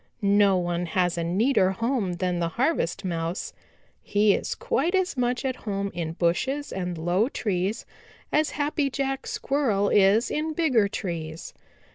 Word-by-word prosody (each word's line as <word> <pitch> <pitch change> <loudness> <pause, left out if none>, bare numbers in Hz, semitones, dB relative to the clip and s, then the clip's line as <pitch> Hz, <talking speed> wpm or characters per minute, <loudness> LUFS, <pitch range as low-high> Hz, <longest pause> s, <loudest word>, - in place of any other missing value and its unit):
No 200 -1 +4
one 175 0 -1
has 180 +1 +1
a 170 - -2
neater 190 +3 +2
home 230 -3 -1
than 180 0 -1
the 170 - 0
Harvest 235 - -1
Mouse. 170 0 -3 0.5
He 205 0 +3
is - - -2
quite 465 -7 0
as 375 -3 +1
much 250 +1 -1
at 260 -1 -1
home 200 -2 -3
in 165 -2 -3
bushes 260 +13 0
and 180 -2 -3
low 175 +8 +1
trees 200 -4 -2 0.5
as 305 0 +2
Happy 290 -1 -1
Jack 270 0 -2
Squirrel 230 -8 0
is 205 +4 +4
in 310 +1 -1
bigger 270 -11 +3
trees. 165 -5 -5
200 Hz, 150 wpm, -26 LUFS, 175-270 Hz, 0.5 s, No